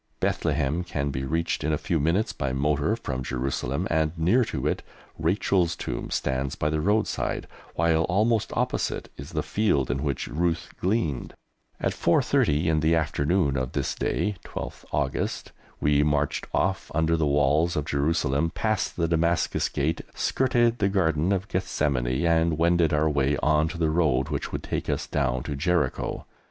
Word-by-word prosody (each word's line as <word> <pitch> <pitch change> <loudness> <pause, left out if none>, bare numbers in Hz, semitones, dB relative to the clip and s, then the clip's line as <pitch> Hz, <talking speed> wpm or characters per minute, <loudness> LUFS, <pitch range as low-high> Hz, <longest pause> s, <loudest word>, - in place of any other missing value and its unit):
Bethlehem 75 +6 0
can 70 -5 -2
be 65 0 -3
reached 80 +5 -1
in 80 - 0
a 75 - +1
few 85 -1 -1
minutes 85 +9 +1
by 70 -2 -2
motor 75 +8 +1
from 65 - -4
Jerusalem, 65 +6 -2
and 80 +1 +1
near 95 +11 +3
to 115 - -4
it - - 0 0.4
Rachel's 85 +1 +1
tomb - - -4
stands 65 0 -1
by 75 - -1
the 75 0 0
roadside, 105 +5 0 0.3
while 80 0 +2
almost 110 +4 +1
opposite - - -1
is - - -9
the - - -1
field 90 - +1
in 70 - -2
which 70 -4 -2
Ruth 85 +2 -1
gleaned. 90 - -1 0.4
At - - 0
4.30 75 +4 +2
in 80 -1 +2
the 80 +2 +3
afternoon 80 0 +1
of 65 -1 -2
this - - -1
day 105 -2 -1
(12th - - -7
August) - - -2 0.3
we 75 0 +3
marched 75 -1 0
off 95 0 0
under 80 +1 +2
the 80 -2 +1
walls 75 +4 +2
of 75 - -1
Jerusalem, 70 +1 +1
past 110 -2 -1
the 85 -1 +1
Damascus 85 0 +1
Gate, 80 +4 -1
skirted 120 -2 +2
the 100 - +2
Garden 85 -3 +1
of 95 0 0
Gethsemane, 70 -7 0
and 80 -1 +2
wended 85 -1 +3
our 75 +1 +2
way 70 -1 +1
on 75 +1 +3
to 85 +2 -6
the 80 -2 +1
road 75 -6 +2
which - - -3
would - - -4
take - - -3
us 75 +1 -1
down 65 -4 -1
to 70 - -4
Jericho. 75 -2 -1
80 Hz, 170 wpm, -26 LUFS, 70-85 Hz, 0.4 s, near